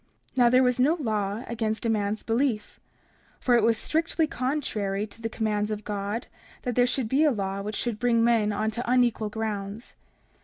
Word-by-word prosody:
30:7 - - -28
Now 245 -1 +6
there 255 +2 +5
was 250 0 +2
no 290 +6 +4
law 215 - -2
against 225 -1 -2
a - - +2
man's 210 -1 0
belief; 230 -2 -1 0.6
for 250 - +2
it 240 - +5
was 225 +1 +3
strictly 320 +3 +1
contrary 235 -9 -2
to 220 +2 -14
the 225 - -2
commands 215 -2 -1
of 215 0 -4
God 205 +3 -3 0.4
that 245 - -1
there 245 +1 +4
should 250 -2 -1
be 270 +7 +3
a 310 - +5
law 195 -5 -2
which 210 +1 -4
should 235 -3 -2
bring 235 -1 +3
men 230 -3 +3
on 215 +2 -1
to 235 +2 -4
unequal 240 -4 +2
grounds. 210 0 -4
225 Hz, 195 wpm, -26 LUFS, 210-245 Hz, 0.6 s, Now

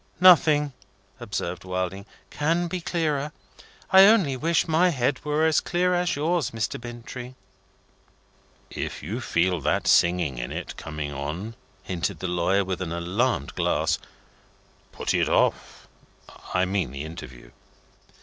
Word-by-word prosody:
"Nothing," 155 -5 +6 0.5
observed 100 -6 -4
Wilding, 95 +2 -3 0.2
"can 165 +4 0
be 180 +1 -4
clearer. 150 -4 -1 0.6
I 190 0 +9
only 195 -11 +4
wish 165 +6 +1
my 165 +3 +4
head 135 -3 -1
were 150 +1 +1
as 160 -2 +4
clear 180 0 +1
as 175 0 +1
yours, 160 +3 0
Mr. 115 +1 -3
Bintrey." 120 +1 -8 1.4
"If - - -5
you 110 - -4
feel 90 -5 +1
that - - 0
singing 85 -7 +3
in - - -4
it - - -5
coming 75 -2 -5
on," 75 +11 -5 0.3
hinted 90 +1 -3
the 95 - -4
lawyer, 90 +3 +1
with 95 -1 -3
an 85 -3 -3
alarmed 90 - -1
glance, - - 0 0.9
"put - - -2
it - - +2
off. - - 0 0.6
I 90 0 +2
mean 95 -6 -1
the 70 +3 -6
interview." - - -10
115 Hz, 135 wpm, -25 LUFS, -, 1.4 s, I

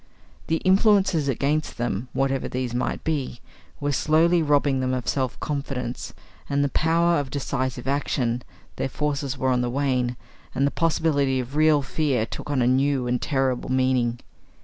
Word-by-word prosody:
The 160 - +1
influences 190 -5 +4
against 140 +4 -1
them, 120 0 -2
whatever 135 0 0
these 125 -2 -3
might 125 - -2
be, 145 -6 -2 0.4
were 145 0 -1
slowly 165 +4 +3
robbing 145 -3 +2
them 130 0 0
of 125 - -5
self 130 -3 -1
confidence, 135 -4 -4 0.4
and 140 0 +1
the 140 - +1
power 170 +3 +2
of 140 -2 -4
decisive 130 -2 -3
action; 125 -3 0 0.4
their - - -1
forces 140 -2 -2
were 130 0 0
on 125 -1 +2
the 125 - -1
wane, 125 -2 0 0.4
and 140 - +2
the 140 - +1
possibility 145 -5 +1
of 125 +3 -5
real 155 -2 +4
fear 135 -5 0
took - - -8
on 135 -4 +1
a - - +2
new 135 0 +2
and 125 0 0
terrible 135 -3 0
meaning. 130 -2 +1
135 Hz, 165 wpm, -24 LUFS, 125-150 Hz, 0.4 s, influences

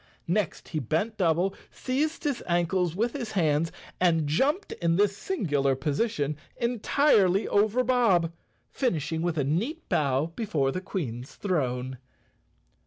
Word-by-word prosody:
Next 180 0 -1
he 155 - -2
bent 160 - -1
double, 180 +1 +2 0.2
seized 295 +5 -2
his 285 -5 -1
ankles 175 0 +1
with 230 +4 0
his 240 -6 -5
hands 160 -3 +2 0.3
and 165 -4 +3
jumped 275 - +1
in 165 -1 +2
this 200 +1 +3
singular 145 - 0
po¬ 135 +3 -2
sition 150 -6 -1 0.2
entirely 230 -4 +3
over 215 +5 +2
Bob, 225 -10 +3 0.4
finishing 160 - -1
with 170 -1 -1
a 145 - +2
neat 215 - -2
bow 145 +2 +1
be¬ 225 - -3
fore 135 -7 +1
the 185 - -3
Queen's 130 - -5
throne. 130 - -2
175 Hz, 140 wpm, -27 LUFS, 150-225 Hz, 0.4 s, and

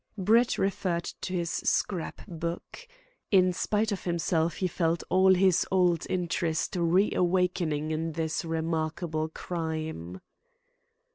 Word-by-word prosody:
'" - - -40
Brett 225 +5 +3
referred 190 -3 0 0.2
to 185 0 -4
his 170 -2 -1
scrap 180 -5 -1
book. 170 - -6 0.4
In 185 -2 +4
spite 215 +4 0
of 200 - -3
himself, 170 -1 0
he 185 - -1
felt 165 -1 0
all 190 0 +5
his 185 -1 +4
old 180 -3 +2
interest 170 -2 -1
reawakening 175 -3 +1
in 160 +1 -2
this 160 0 -2
remarkable 160 0 -2
crime. 160 - -5
170 Hz, 120 wpm, -28 LUFS, 160-185 Hz, 0.4 s, all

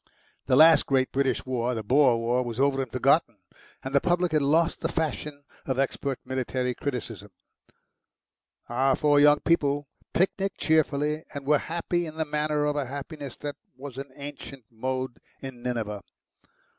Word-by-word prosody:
The 130 - +4
last 160 +3 +7
great 130 -1 +2
British 135 -1 0
war, 125 -1 -1
the 110 - -4
Boer 130 +2 +4
war, 120 +2 +1
was 120 -1 -5
over 135 0 +2
and 130 -4 -5
forgotten, 130 -2 +2 0.5
and 135 - -5
the 140 - +4
public 175 -1 +1
had 155 -1 +2
lost 160 +4 +2
the - - 0
fashion 150 -2 -3 0.2
of 130 -2 -1
expert 135 0 -1
military 130 -1 -2
criticism. 115 -7 -5 1.4
Our 130 +3 +2
four 145 -2 +3
young 145 0 +6
people 145 -3 +1 0.2
picnicked 195 +2 0
cheerfully, 150 -1 +1
and 140 -1 -6
were 150 0 +4
happy 170 +1 -2
in 155 0 -9
the 160 - 0
manner 150 0 0
of 150 0 0
a 145 -3 -1
happiness 140 0 -7
that 145 -1 -5 0.2
was 135 -1 -8
an 135 0 -7
ancient 140 -3 -9
mode 130 +2 -3 0.2
in 130 -3 -9
Nineveh. 115 -5 -3
140 Hz, 160 wpm, -26 LUFS, 130-150 Hz, 1.4 s, last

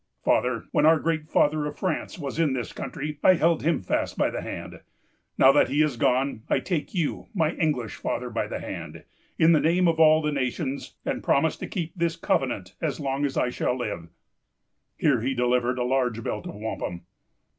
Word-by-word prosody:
"Father, 125 -2 +1
when - - +2
our 160 0 +6
great 160 -1 -1
father 150 0 +2
of 150 - -7
France 185 -5 -2
was 145 -2 -5
in 155 -5 +2
this 125 -4 -4
country, 145 +3 -5
I 185 - +7
held 165 -1 +2
him 165 - 0
fast - - -1
by - - +2
the - - -4
hand. - - -7 0.6
Now 135 - +7
that 145 - +3
he 145 +2 +3
is 150 -4 0
gone, 130 0 +1
I - - +3
take 175 0 -3
you, 165 -5 -1
my 160 -4 +2
English 150 - -1
father, - - -3
by - - -1
the - - -4
hand, - - -7 0.3
in 160 +1 +5
the 160 - +5
name 175 +4 +3
of 165 -1 +1
all 155 0 +6
the 150 - 0
nations, 135 +1 -3
and - - -2
promise - - +2
to - - -6
keep 170 -2 -4
this 170 -2 -1
covenant 120 - -1
as 155 -2 -2
long 140 0 -1
as 140 - -3
I 125 - +1
shall 125 - -1
live." 100 -9 -4 0.9
Here 135 -6 +2
he 130 +3 -1
delivered 125 0 +1
a 125 - 0
large 125 -3 0
belt 105 - -4
of - - -7
wampum. 105 -5 -4
145 Hz, 200 wpm, -26 LUFS, 125-160 Hz, 0.9 s, I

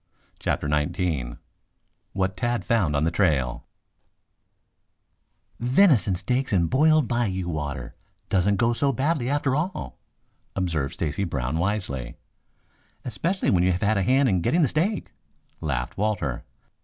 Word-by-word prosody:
CHAPTER - - -1
XIX 75 -4 -1 0.8
WHAT 95 0 -1
TAD 120 -3 -1
FOUND 90 -9 +1
ON 70 - +1
THE 85 - +1
TRAIL 75 -10 0 1.9
"Venison 125 - +4
steak 125 +8 -1
and 90 -4 +3
boiled 155 0 +4
bayou 100 -7 -1
water 75 -5 -4 0.3
doesn't 100 +2 +2
go 120 +2 +2
so 140 +3 +1
badly 135 0 0
after 140 -2 +1
all," 150 - -3 0.6
observed 85 -7 -1
Stacy 85 +5 -2
Brown 70 -3 -2
wisely. 85 - -2 0.9
"Especially 170 - -1
when 90 -2 +3
you 90 +1 +3
have 90 - -3
had 105 +1 +2
a - - +2
hand 130 +7 +3
in 95 -6 +2
getting 165 - +2
the - - +4
steak," 180 - -1 0.5
laughed 65 -3 -3
Walter. 100 - -1
95 Hz, 130 wpm, -25 LUFS, 80-125 Hz, 1.9 s, Venison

